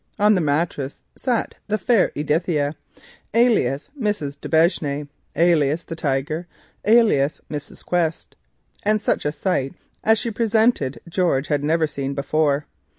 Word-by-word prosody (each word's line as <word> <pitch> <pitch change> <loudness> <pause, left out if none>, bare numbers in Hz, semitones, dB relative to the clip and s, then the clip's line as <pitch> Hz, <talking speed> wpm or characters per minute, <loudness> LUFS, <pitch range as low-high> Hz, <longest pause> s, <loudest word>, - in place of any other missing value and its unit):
On 210 0 +5
the 185 - +2
mattress 145 -2 -1
sat 245 -4 -1
the 215 0 0
fair 225 -2 +3
Edithia, 150 0 0 0.6
alias 215 - +3
Mrs. 205 - -2
d'Aubigne, 160 -3 +1 0.3
alias 160 -1 +3
the 165 - -7
Tiger, 150 +3 -2 0.4
alias 210 -11 +4
Mrs. 145 -1 -7
Quest, 165 -2 -1 0.5
and 215 +1 +2
such 205 - -1
a 150 - +1
sight 150 -4 -1 0.3
as 220 0 +4
she 230 +2 -2
presented 220 - +1
George 170 -5 0
had 145 -2 +1
never 160 +2 +2
seen 140 -2 -4
before. 145 +1 +1
160 Hz, 130 wpm, -22 LUFS, 145-205 Hz, 0.6 s, On